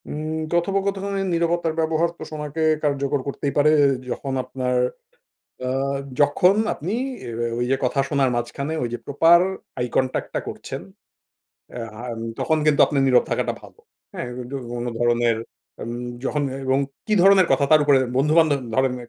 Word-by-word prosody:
উম 155 +1 -3 0.2
কথোপকথনে 195 +2 0
নিরবতার 170 -1 +1
ব্যবহার 160 +1 +1
কে - - -7
সময়কে 150 +1 -4 0.2
কার্যকর 140 -1 0
করতেই 140 0 -3
পারে। 150 +1 +5
এ - - +6 0.2
যখন 135 +2 -4
আপনার 125 -1 -2 0.9
আ - - -1 0.5
যখন 180 +6 +4 0.2
আপনি 175 +7 -5 0.3
এ্যা - - -6 0.2
ও - - -4
ওই 120 - +1
যে 135 - +3
কথা 130 +2 +1
শোনার 140 -3 +2
মাঝখানে 140 +6 -3
ওই 120 - -1
যে 120 - -3
প্রপার 165 +4 +5 0.4
আইকনট্যাক্ট 125 +2 -1
টা - - 0
করছেন। - - -6 0.9
এ্যা 120 - -5 0.3
আম 115 -1 -6 0.2
তখন 160 -1 +1
কিন্তু 150 -2 +3
আপনার 140 -2 +1
নীরব 125 -2 +4
থাকাটা - - 0
ভালো। - - -16 0.3
হ্যাঁ 125 - -4
উদ্দ 125 +2 -9 0.3
অন্য 120 +1 -3
ধরনের 120 -1 +2 0.5
আম 115 - -5 0.3
যখন 145 +2 0 0.2
এবং 130 +1 +3 0.3
কি 215 - +2
ধরনের 195 -1 +6
কথা? 140 - +3
তার 155 -1 +7
উপরে 140 -2 +5 0.2
বন্ধু-বান্ধব 150 +1 +3
ধরনের 125 -1 0
145 Hz, 155 wpm, -22 LUFS, 130-160 Hz, 0.9 s, তার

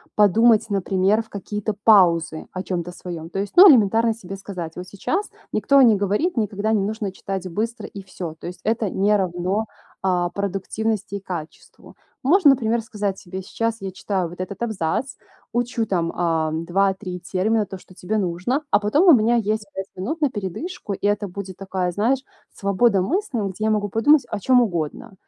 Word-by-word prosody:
подумать, 220 +2 +4
например, 195 +2 +1
в 225 - -25
какие-то 210 +1 -4
паузы 170 -7 +4
о 185 - -4
чём-то 180 -2 -3
своём. 170 -2 -7
То 195 - -3
есть, 200 0 -4
ну, 375 +3 +10
элементарно 225 -1 +4
себе 195 -4 -9
сказать: 180 -4 -7
"Вот 180 +1 -7
сейчас 340 - -3 0.2
никто 275 +7 +4
не 230 -4 +6
говорит, 205 - 0
никогда 215 0 0
не 210 - +2
нужно 210 0 -3
читать 190 0 -5
быстро 220 +5 -3
и 200 - -9
всё". 180 -4 -7
То - - -11
есть 180 +1 -7
это 220 -3 0
не 205 +2 +2
равно, 185 +3 -1 0.4
а, 180 -2 +1
продуктивности 200 +2 -3
и - - -3
качеству. 175 -5 -9 0.3
Можно, 305 +2 +6
например, 235 -3 +1
сказать 205 -3 -3
себе: 185 +1 -7
"Сейчас 230 +4 -2
я 195 -1 -4
читаю 185 -2 -2
вот 175 - -12
этот 190 +3 -6
абзац, 220 +3 -2 0.4
учу, 240 -1 0
там, 170 -5 -1
а, 165 -2 0
2-3 180 +3 -1
термина, 210 +5 0
то, 190 - -8
что 185 - -18
тебе 185 +4 -3
нужно, 190 - -1
а - - +4
потом 250 - +2
у 340 - +10
меня 235 -1 +4
есть 215 -1 0
5 195 - -4
минут 265 - -4
на 295 - +3
передышку". 205 - -5
И 195 - -5
это 205 0 0
будет 190 0 -7
такая, 190 -2 -2
знаешь, 230 +9 +1 0.3
свобода 200 +1 +2
мысли, 290 - -1
м, 205 - -1
где 205 +3 -4
я - - +2
могу 205 -1 0
подумать 265 +6 +4
о 210 - -3
чём 250 +5 +4
угодно. 175 -5 -3
200 Hz, 185 wpm, -22 LUFS, 185-225 Hz, 0.4 s, ну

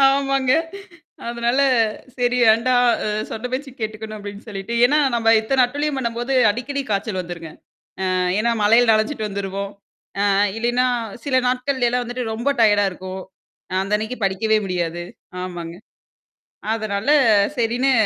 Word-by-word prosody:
ஆமாங்க. 275 -1 +2 0.8
அதனால 235 +2 0 0.6
சரி 245 0 +1
வேண்டாம் 230 +3 +1 0.3
அ - - -2 0.2
சொன்ன 225 +3 -4
பேச்சுக்கு 265 -1 -5
கேட்டுக்கணும் 215 0 -5
அப்பிடின்னு 205 +1 -9
சொல்லிட்டு 200 +2 -5
ஏன்னா, 290 +5 +4 0.2
நம்ம 225 -1 +3
எத்தன 255 +3 +2
அட்டூழியம் 290 +2 -2
பண்ணும்போது 240 +1 -2 0.2
அடிக்கடி 270 +6 -3
காய்ச்சல் 200 -1 -1
வந்துருங்க. 170 -2 -7 0.6
அ - - +1 0.3
ஏன்னா, 235 +2 +1
மழையில 230 +3 +5
நனஞ்சிட்டு 215 +1 0
வந்துருவோம். 200 0 -4 0.6
அ - - +3 0.2
இல்லையின்னா 240 +2 +1 0.4
சில 260 -2 +2
நாட்கள்லைலாம் 250 -1 0
வந்துட்டு 245 +1 -4
ரொம்ப 235 +5 -2
டயர்டா 205 -2 +5
இருக்கும். 185 +1 -7 0.5
அ - - -2
அந்த 195 +2 -1
அன்னக்கி 220 +4 -5
படிக்கவே 215 +3 +1
முடியாது. 175 -2 -2 0.4
ஆமாங்க. 175 -2 -6 1.0
அதனால, 215 0 -3 0.5
சரின்னு 240 +3 +1
225 Hz, 130 wpm, -21 LUFS, 200-250 Hz, 1.0 s, மழையில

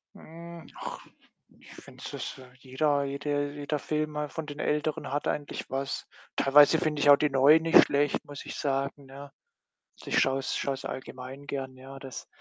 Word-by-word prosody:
Hm, 170 +1 -11
ach, - - -6 0.5
ich - - -15
finde - - -13
es - - -6
dass - - -6 0.2
jeder 140 +2 +1
jede 145 +1 -2
jeder 145 0 -3
Film 155 +1 -2
mal 150 -1 -3
von 160 - -5
den 145 0 -8
Älteren 150 -1 -1
hat 145 +1 -1
eigentlich 145 -1 -3
was. 135 +1 -3 0.3
Teilweise 145 +3 +6
finde 150 -2 -1
ich 145 - +4
auch 145 - +11
die 150 0 +2
Neuen 140 +4 +6
nicht 165 - +7
schlecht, 145 0 +1
muss 145 -1 -9
ich - - -6
sagen, 140 0 -2
ne? 140 +1 -11 0.7
Ich - - +2
schaue 135 0 +2
es 135 - -2
schaue 140 - -1
es 135 - -9
allgemein 130 +2 -7
gern. 135 -2 -4
Ja, 135 +1 -10
das 135 -3 -8
145 Hz, 185 wpm, -28 LUFS, 135-150 Hz, 0.7 s, auch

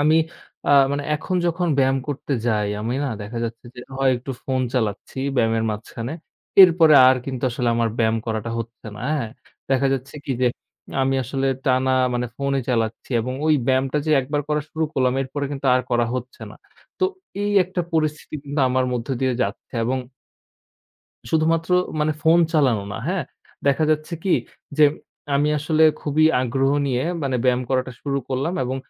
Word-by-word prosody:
আমি 155 +2 +4 0.5
আ - - +4 0.2
মানে 145 0 -1
এখন 180 +5 -2
যখন 175 +1 0
ব্যায়াম 135 0 +3
করতে 145 0 -3
যাই, 105 -3 +1
আমি 115 +3 -2
না - - -1
দেখা 110 +3 -6
যাচ্ছে 115 +1 -6
যে - - -9
হয় 135 0 +2
একটু 125 +3 -7
ফোন 130 -1 0
চালাচ্ছি 110 0 -2 0.2
ব্যায়ামের 115 -1 +2
মাঝখানে। 115 +4 -5 0.5
এরপরে 165 -3 +6
আর 130 - +5
কিন্তু 130 -3 -4
আসলে 120 0 -1
আমার 115 -1 +2
ব্যায়াম 110 -1 +2
করাটা 110 0 -2
হচ্ছে 115 0 -7
না, - - -9 0.2
হ্যাঁ? 115 -5 -4 0.4
দেখা 135 +1 +3
যাচ্ছে 135 +2 -7
কি 140 - 0
যে 125 - +5 0.5
আমি 135 0 +1
আসলে 135 +2 -2 0.2
টানা 130 0 +2 0.2
মানে 125 0 -1
ফোনই 140 -1 0
চালাচ্ছি 115 -1 -1
এবং 130 +3 -3
ওই 155 - +5
ব্যায়ামটা 130 +2 +1
যে - - +1
একবার 145 +3 -2
করা 150 0 +1
শুরু 160 0 -1
করলাম 130 -1 +2
এরপরে 140 +2 -4
কিন্তু 140 0 -4
আর 130 - +3
করা 120 -1 +2
হচ্ছে 125 0 -6
না। - - -12 0.4
তো 375 - +2 0.4
এই 205 - 0
একটা 185 0 -3
পরিস্থিতি 155 -1 -1
কিন্তু 145 +1 -2
আমার 130 0 +1
মধ্য 120 0 -3
দিয়ে 130 -2 +1
যাচ্ছে 100 - -5
এবং 130 +2 0 1.3
শুধুমাত্র 165 +1 +1 0.3
মানে 155 +1 +2
ফোন 165 +1 +5
চালানো 130 -10 +2
না, 105 - -5
হ্যাঁ? 185 -5 -1 0.4
দেখা 140 +3 +3
যাচ্ছে 155 +2 -1
কি 190 - +3 0.4
যে, 150 - +8 0.5
আমি 145 +2 +2
আসলে 155 +1 +1 0.2
খুবই 155 +1 +2 0.2
আগ্রহ 135 +2 +1 0.2
নিয়ে, 130 -1 0 0.2
মানে 135 -2 0
ব্যায়াম 125 0 +3
করাটা 130 -1 0
শুরু 140 -1 -1
করলাম 135 +7 -1
এবং 130 +2 -2
135 Hz, 175 wpm, -22 LUFS, 125-150 Hz, 1.3 s, যে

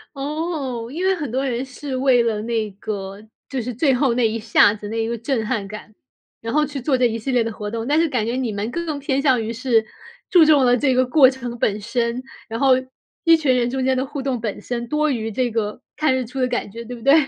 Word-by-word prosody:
哦， 280 -5 -3
因 345 +6 -3
为 380 0 +3
很 295 -9 -5
多 265 +2 -1
人 250 -1 -1
是 265 +1 -6
为 255 -2 +4
了 220 -2 -1
那 225 -1 -1
个 195 0 -6 0.3
就 265 -2 -2
是 245 +2 -4
最 270 +4 +2
后 255 -1 +2
那 235 -1 +2
一 220 +1 -2
下 215 -2 +4
子、 205 -1 -8
那 225 +1 -2
一 - - -2
个 235 +1 -2
震 230 0 -1
撼 215 -4 -1
感， 215 +1 -9 0.5
然 230 0 -4
后 300 +1 +3
去 285 -2 -6
做 265 0 +1
这 250 - +3
一 230 -1 -3
系 245 +4 -3
列 245 - +3
的 225 - -3
活 210 0 -6
动。 230 +1 -4
但 295 - +2
是 330 -1 +2
感 250 -6 0
觉 230 - -2
你 255 -3 -1
们 205 +2 -3
更 320 -1 -3
偏 275 -1 0
向 260 -5 +3
于 225 +1 -3
是 230 -2 +1 0.4
注 355 -5 +7
重 300 -4 +5
了 245 0 +5
这 265 +1 +2
个 255 +1 +3
过 260 +1 +6
程 245 -2 -6
本 210 -2 0
身， 235 +3 -1 0.3
然 225 +1 -4
后 270 0 +4 0.5
一 330 -1 +6
群 280 -5 +2
人 245 -1 +1
中 260 +1 -2
间 260 0 +2
的 260 +1 0
互 280 0 -5
动 260 -2 -2
本 215 -3 -3
身 240 -1 -4
多 305 0 +1
于 225 -5 -2
这 250 +3 0
个 225 +1 -3
看 305 -3 +2
日 260 -1 -1
出 260 +3 -5
的 255 - +3
感 245 -4 -2
觉， 230 +4 -8
对 245 +2 -7
不 235 - -12
对？ 275 +4 +5
250 Hz, 280 characters per minute, -21 LUFS, 225-275 Hz, 0.5 s, 注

